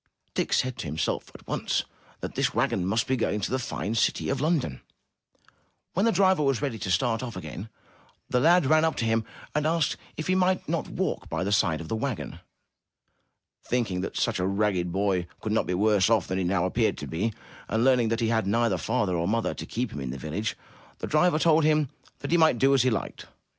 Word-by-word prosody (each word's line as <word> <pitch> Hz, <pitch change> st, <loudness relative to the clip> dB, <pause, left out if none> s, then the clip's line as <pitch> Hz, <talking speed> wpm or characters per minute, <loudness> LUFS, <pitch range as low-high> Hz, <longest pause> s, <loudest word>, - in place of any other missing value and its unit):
Dick -, -, -1 dB
said 130 Hz, -1 st, +1 dB
to -, -, -4 dB
himself 75 Hz, +2 st, -2 dB
at -, -, -13 dB
once -, -, -1 dB, 0.4 s
that -, -, -5 dB
this -, -, 0 dB
wagon 90 Hz, -2 st, +1 dB
must 110 Hz, +4 st, +1 dB
be 130 Hz, -, +1 dB
going 110 Hz, -3 st, 0 dB
to 100 Hz, -, -3 dB
the 130 Hz, -, +1 dB
fine 110 Hz, -3 st, -3 dB
city 115 Hz, -, +1 dB
of 135 Hz, -1 st, -1 dB
London. 150 Hz, -, 0 dB, 1.1 s
When 195 Hz, +6 st, +2 dB
the -, -, +4 dB
driver 190 Hz, -3 st, +3 dB
was 135 Hz, -4 st, +2 dB
ready 135 Hz, -6 st, -3 dB
to 95 Hz, -, -4 dB
start 110 Hz, +6 st, +1 dB
off 120 Hz, -3 st, -6 dB
again, 90 Hz, +4 st, -7 dB, 0.6 s
the 125 Hz, -, +1 dB
lad 170 Hz, +4 st, +5 dB
ran 155 Hz, +3 st, +4 dB
up 160 Hz, -, +1 dB
to 115 Hz, -, -1 dB
him 115 Hz, 0 st, +1 dB, 0.3 s
and 150 Hz, +1 st, +1 dB
asked 165 Hz, -1 st, +1 dB, 0.2 s
if 155 Hz, -, -3 dB
he 185 Hz, -, +1 dB
might 185 Hz, 0 st, +1 dB
not -, -, -1 dB
walk -, -, -3 dB
by -, -, -2 dB
the 100 Hz, -, -1 dB
side 90 Hz, -6 st, +2 dB
of 80 Hz, -, -8 dB
the 110 Hz, -, -2 dB
wagon. 120 Hz, +1 st, -4 dB, 1.2 s
Thinking 110 Hz, -7 st, -1 dB
that 95 Hz, -, -4 dB
such -, -, 0 dB
a 90 Hz, -, +1 dB
ragged 100 Hz, -3 st, 0 dB
boy 95 Hz, -2 st, 0 dB
could 110 Hz, -, -4 dB
not 110 Hz, -, +1 dB
be 90 Hz, -, 0 dB
worse 105 Hz, +1 st, +3 dB
off 110 Hz, -6 st, +3 dB
than 95 Hz, +1 st, -2 dB
he -, -, 0 dB
now 90 Hz, 0 st, +1 dB
appeared 110 Hz, +4 st, +1 dB
to -, -, -5 dB
be, 85 Hz, +11 st, -1 dB, 0.4 s
and 110 Hz, +1 st, 0 dB
learning 125 Hz, -3 st, +4 dB
that 115 Hz, +1 st, -1 dB
he 115 Hz, -, +1 dB
had 110 Hz, -3 st, +1 dB
neither 115 Hz, -3 st, +2 dB
father 110 Hz, -2 st, 0 dB
nor 85 Hz, 0 st, 0 dB
mother 115 Hz, +2 st, 0 dB
to -, -, -7 dB
keep 125 Hz, +1 st, -3 dB
him -, -, -5 dB
in 65 Hz, -, -4 dB
the 65 Hz, -, -5 dB
village, 85 Hz, -, -3 dB, 0.4 s
the -, -, -5 dB
driver 155 Hz, +1 st, +3 dB
told 160 Hz, 0 st, +4 dB
him 150 Hz, -2 st, +3 dB, 0.3 s
that -, -, -4 dB
he 170 Hz, -, +5 dB
might 160 Hz, -6 st, +4 dB
do 135 Hz, +4 st, +4 dB
as 135 Hz, -, +4 dB
he 130 Hz, -, +3 dB
liked. 110 Hz, -5 st, -4 dB
115 Hz, 225 wpm, -27 LUFS, 95-140 Hz, 1.2 s, lad